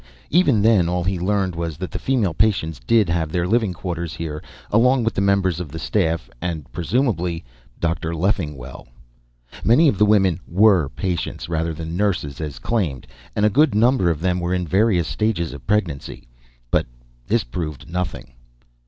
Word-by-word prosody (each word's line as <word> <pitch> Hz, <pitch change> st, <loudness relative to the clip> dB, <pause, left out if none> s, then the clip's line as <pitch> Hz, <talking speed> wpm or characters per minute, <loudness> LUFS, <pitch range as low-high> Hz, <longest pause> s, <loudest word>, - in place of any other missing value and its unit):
Even 140 Hz, -, +4 dB
then, 105 Hz, -7 st, +4 dB
all 90 Hz, 0 st, -1 dB
he 90 Hz, 0 st, -1 dB
learned 95 Hz, 0 st, 0 dB
was 85 Hz, -2 st, -4 dB
that 95 Hz, +2 st, -5 dB
the -, -, -4 dB
female 115 Hz, -10 st, 0 dB
patients 80 Hz, -7 st, +1 dB
did 110 Hz, -4 st, +4 dB
have 85 Hz, -2 st, -1 dB
their 90 Hz, 0 st, 0 dB
living 110 Hz, -1 st, +2 dB
quarters 85 Hz, -2 st, -5 dB
here, 75 Hz, -2 st, -5 dB, 0.3 s
along 125 Hz, +3 st, +4 dB
with 115 Hz, -1 st, 0 dB
the 95 Hz, -, -1 dB
members 100 Hz, -3 st, +2 dB
of 90 Hz, -4 st, -5 dB
the 80 Hz, -, -7 dB
staff 80 Hz, -, 0 dB
and 80 Hz, -4 st, -3 dB
presumably 90 Hz, -, -1 dB, 0.4 s
Dr. 85 Hz, 0 st, -1 dB
Leffingwell. 75 Hz, -8 st, -2 dB, 0.8 s
Many 125 Hz, +9 st, +5 dB
of 105 Hz, -, +1 dB
the 105 Hz, -, +6 dB
women 95 Hz, -5 st, +3 dB
were 95 Hz, -5 st, +4 dB
patients 90 Hz, -1 st, -3 dB
rather 80 Hz, 0 st, -1 dB
than 80 Hz, +1 st, -5 dB
nurses, 90 Hz, -8 st, -1 dB
as 75 Hz, -4 st, -5 dB
claimed, 85 Hz, -, -2 dB, 0.3 s
and 105 Hz, -, +2 dB
a -, -, +5 dB
good 150 Hz, 0 st, +3 dB
number 115 Hz, -4 st, +3 dB
of 80 Hz, -2 st, -1 dB
them 90 Hz, 0 st, +1 dB
were 90 Hz, +1 st, -1 dB
in 90 Hz, -1 st, -1 dB
various 95 Hz, -2 st, +2 dB
stages 100 Hz, -7 st, -1 dB
of 65 Hz, -4 st, -11 dB
pregnancy, 85 Hz, -, -2 dB, 0.4 s
but -, -, +2 dB, 0.4 s
this -, -, +2 dB
proved 75 Hz, +1 st, -5 dB
nothing. 90 Hz, -6 st, -4 dB
90 Hz, 170 wpm, -21 LUFS, 80-105 Hz, 0.8 s, the